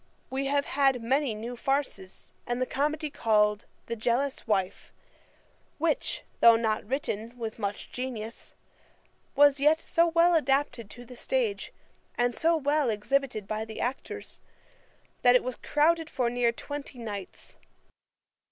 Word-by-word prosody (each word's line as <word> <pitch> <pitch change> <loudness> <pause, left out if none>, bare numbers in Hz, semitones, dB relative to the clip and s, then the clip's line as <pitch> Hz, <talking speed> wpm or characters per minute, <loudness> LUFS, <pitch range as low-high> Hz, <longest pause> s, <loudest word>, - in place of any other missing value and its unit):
We 270 +1 -1
have 280 0 +1
had 270 -4 +2
many 265 0 +1
new 235 +3 -6
farces, 270 -8 -3
and 240 0 -1
the 255 - +1
comedy 300 +3 -1
called 210 -3 +2 0.2
The 235 - -4
Jealous 245 +5 -1
Wife, 190 -4 -1 0.9
which, 320 +1 -1 0.2
though 230 -1 +8
not 220 -1 0
written 235 -2 -3
with 225 -1 -5
much 205 -1 -4
genius, 235 -3 -5 0.8
was 285 -1 +6
yet 305 +3 +4
so 335 +1 +2
well 335 +1 +4
adapted 275 -7 +1
to 245 +2 -11
the 250 - -12
stage, 475 - -1 0.5
and 245 0 +2
so 330 +1 +2
well 290 -2 +1
exhibited 220 0 -1
by 215 +1 -2
the 220 0 -8
actors, 250 +2 -4 0.8
that 245 0 +6
it 250 - +4
was 255 -1 -4
crowded 325 +2 +2
for 240 -2 0
near 245 -1 +2
twenty 285 +2 -7
nights. 205 -5 -8
250 Hz, 140 wpm, -28 LUFS, 225-290 Hz, 0.9 s, though